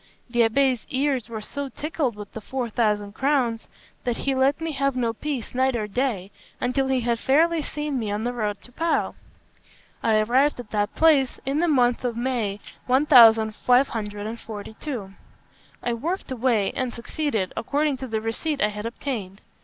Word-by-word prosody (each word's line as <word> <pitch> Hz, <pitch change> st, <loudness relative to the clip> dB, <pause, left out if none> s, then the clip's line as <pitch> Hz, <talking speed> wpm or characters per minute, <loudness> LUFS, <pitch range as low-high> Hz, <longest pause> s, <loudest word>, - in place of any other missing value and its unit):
The 240 Hz, -, -1 dB
abbé's 245 Hz, +1 st, +3 dB
ears 265 Hz, -3 st, 0 dB
were 220 Hz, -2 st, -5 dB
so 280 Hz, +5 st, -5 dB
tickled 295 Hz, -5 st, -2 dB
with 205 Hz, -1 st, -9 dB
the 220 Hz, -, -6 dB
four 245 Hz, +1 st, -4 dB
thousand 210 Hz, -3 st, 0 dB
crowns, 255 Hz, -4 st, 0 dB, 0.4 s
that 245 Hz, -2 st, -1 dB
he 275 Hz, -, 0 dB
let 265 Hz, +3 st, +2 dB
me 325 Hz, 0 st, -3 dB
have 275 Hz, -2 st, 0 dB
no 235 Hz, -3 st, 0 dB
peace 270 Hz, -1 st, -4 dB
night 260 Hz, 0 st, +2 dB
or 215 Hz, -2 st, -1 dB
day 210 Hz, -3 st, -2 dB, 0.3 s
until 265 Hz, +2 st, 0 dB
he 260 Hz, -1 st, +1 dB
had 235 Hz, -1 st, 0 dB
fairly 320 Hz, +6 st, +3 dB
seen 295 Hz, -2 st, -3 dB
me 220 Hz, -3 st, -2 dB
on 210 Hz, +1 st, -2 dB
the 245 Hz, +1 st, -1 dB
road 210 Hz, -4 st, -2 dB
to 245 Hz, -, -15 dB
Pau. 330 Hz, +6 st, 0 dB, 0.9 s
I 220 Hz, -1 st, +3 dB
arrived 250 Hz, +6 st, +3 dB
at 235 Hz, -4 st, -9 dB
that 205 Hz, 0 st, -1 dB
place 295 Hz, -6 st, +4 dB
in 275 Hz, +3 st, 0 dB
the 345 Hz, -, +2 dB
month 250 Hz, -6 st, +3 dB
of 240 Hz, -2 st, -2 dB
May 235 Hz, -5 st, -1 dB, 0.3 s
1542. 225 Hz, -3 st, +3 dB, 0.7 s
I 240 Hz, -, 0 dB
worked 320 Hz, +8 st, -3 dB
away, 235 Hz, -5 st, +1 dB
and 255 Hz, -2 st, -1 dB
succeeded, 235 Hz, -4 st, -2 dB
according 290 Hz, +3 st, 0 dB
to 260 Hz, 0 st, -6 dB
the 220 Hz, -2 st, -2 dB
receipt 275 Hz, +7 st, -2 dB
I 210 Hz, -, +3 dB
had 210 Hz, +1 st, -5 dB
obtained. 220 Hz, -6 st, -5 dB
245 Hz, 170 wpm, -24 LUFS, 220-275 Hz, 0.9 s, place